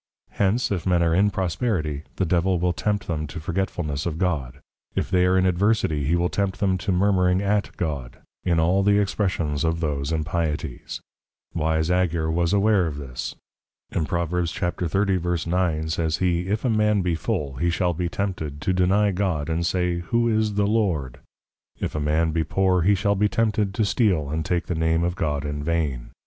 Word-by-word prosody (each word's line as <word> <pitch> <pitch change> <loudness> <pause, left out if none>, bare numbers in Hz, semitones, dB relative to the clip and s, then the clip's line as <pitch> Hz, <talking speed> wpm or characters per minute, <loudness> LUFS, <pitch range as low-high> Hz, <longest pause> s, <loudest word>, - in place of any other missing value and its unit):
_ - - -25
Hence, 105 +5 +1
if 95 -2 -2
men 90 -2 +3
are 85 -1 +2
in 100 +4 +4
Prosperity, 90 - -1
the 95 - 0
Devil 90 +1 +1
will 90 0 +1
tempt 105 +2 -1
them 75 -2 -3
to 80 - -7
Forgetfulness 85 -3 -2
of 80 -2 -3
God; 80 -9 -1 0.4
if - - -1
they 90 -1 +4
are 95 +1 +3
in 95 - +3
Adversity, 90 -5 +1
he 80 +5 +2
will 85 0 +2
tempt 95 0 -2
them 95 -2 +2
to 95 - -1
Murmuring 90 -1 +3
at 100 +1 0
God; 70 -8 -3 0.3
in 85 -2 +2
all 90 +4 +3
the 100 +1 +4
expressions 90 -7 0
of 80 0 0
those 75 -2 -2
impieties. 80 -5 -3 0.5
Wise 80 0 0
Agur 85 -3 +1
was 85 +1 +1
aware 100 -2 +3
of 75 -3 -5
this; 65 -4 -6 0.6
in 80 - -1
Prov. 85 -2 -1
30.9. 90 -1 0
says 80 -1 0
he, 90 -1 0
if 105 +5 -1
a - - +2
man 105 -2 +2
be 90 -1 0
Full, 70 -4 -2
he 85 +4 +1
shall 90 0 +1
be 85 +1 -2
tempted, 85 -7 -3
to 85 +5 0
deny 95 +3 +3
God, 90 -6 -1
and 85 +1 0
say, 90 0 0
who 115 +7 0
is 110 -2 +1
the 100 0 +2
Lord? 95 - 0 0.6
if - - -3
a 75 - -2
man 80 +2 +1
be 80 0 0
Poor, 90 +3 +2
he 100 +4 +4
shall 100 +1 +1
be 105 +1 +2
tempted, 105 -3 +1
_to 110 - +2
steal, 90 - +1
and 80 +1 -1
take 85 +2 -1
the - - -2
Name 80 +1 +1
of 85 0 -1
God 75 -4 -1
in 75 0 -3
vain. 75 -7 -1
85 Hz, 190 wpm, -24 LUFS, 80-95 Hz, 0.6 s, in